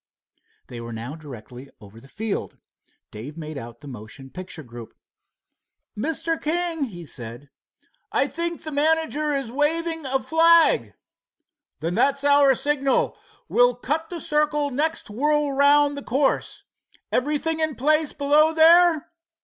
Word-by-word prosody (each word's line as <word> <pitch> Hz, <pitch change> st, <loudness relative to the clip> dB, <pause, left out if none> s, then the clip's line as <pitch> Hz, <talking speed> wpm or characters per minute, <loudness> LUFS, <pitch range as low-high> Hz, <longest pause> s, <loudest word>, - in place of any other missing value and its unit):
They 120 Hz, -2 st, -9 dB
were 115 Hz, 0 st, -7 dB
now 120 Hz, +6 st, -6 dB
directly 130 Hz, -3 st, -11 dB
over 105 Hz, +1 st, -14 dB
the 130 Hz, -, -17 dB
field. 215 Hz, +7 st, -4 dB, 0.5 s
Dave 125 Hz, +9 st, -9 dB
made 155 Hz, -1 st, -7 dB
out 120 Hz, -3 st, -9 dB
the 145 Hz, -, -11 dB
motion 130 Hz, +2 st, -11 dB
picture 180 Hz, 0 st, -8 dB
group. 120 Hz, -2 st, -11 dB, 1.0 s
"Mr. 320 Hz, +7 st, -1 dB
King," 330 Hz, -1 st, +1 dB
he 175 Hz, -8 st, -9 dB
said, 120 Hz, +1 st, -9 dB, 0.6 s
"I -, -, +2 dB
think 340 Hz, 0 st, -4 dB
the 310 Hz, -, -6 dB
manager 305 Hz, 0 st, +1 dB
is 270 Hz, -4 st, -3 dB
waving 320 Hz, +2 st, -1 dB
a 265 Hz, +1 st, +1 dB
flag." 330 Hz, +3 st, +3 dB, 0.9 s
"Then 170 Hz, +7 st, -2 dB
it's 280 Hz, +2 st, +2 dB
our 285 Hz, -2 st, +5 dB
signal. 275 Hz, 0 st, 0 dB, 0.3 s
We'll 245 Hz, 0 st, +3 dB
cut 310 Hz, +6 st, -3 dB
the 345 Hz, -, -5 dB
circle 295 Hz, -1 st, 0 dB
next 305 Hz, -2 st, -1 dB
whirl 295 Hz, +5 st, +1 dB
around 285 Hz, +1 st, +4 dB
the 285 Hz, -, -6 dB
course. 270 Hz, +3 st, -1 dB, 0.5 s
Everything 300 Hz, +4 st, 0 dB
in 315 Hz, -2 st, -1 dB
place 305 Hz, +3 st, +2 dB
below 300 Hz, +3 st, +3 dB
there?" 330 Hz, -1 st, +5 dB
280 Hz, 135 wpm, -23 LUFS, -, 1.0 s, our